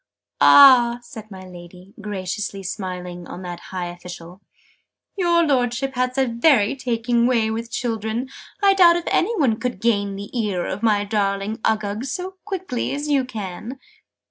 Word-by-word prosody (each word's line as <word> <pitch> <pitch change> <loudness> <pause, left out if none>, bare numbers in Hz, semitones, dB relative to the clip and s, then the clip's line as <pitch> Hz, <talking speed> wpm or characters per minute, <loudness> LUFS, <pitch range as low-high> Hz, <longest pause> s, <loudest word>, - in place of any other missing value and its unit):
"Ah!" 250 -4 +7
said 220 -2 -11
my 190 -2 -10
Lady, 180 +1 -13
graciously 195 0 -4
smiling 180 -3 -6
on 185 - -8
that 175 -1 -6
high 185 -2 -4
official. 175 +1 -10 0.7
"Your 345 -3 +2
Lordship 260 -1 0
has 255 0 -1
a 265 - +3
very 235 -1 +3
taking 235 -2 0
way 230 -3 +1
with 230 +1 -4
children! 225 +1 -3 0.4
I 395 -1 +6
doubt 350 -3 +6
if 345 - -3
any 455 +7 +1
one 235 -7 +2
could 250 -1 -3
gain 205 -4 0
the 200 +4 -9
ear 205 -7 -1
of 190 +2 -4
my 210 -3 +2
darling 200 0 -1
Uggug 215 +1 -1
so 370 +7 -5
quickly 370 - -3
as 290 +1 -4
you 275 -3 +2
can!" 220 +1 -7
225 Hz, 155 wpm, -21 LUFS, 195-255 Hz, 0.7 s, Ah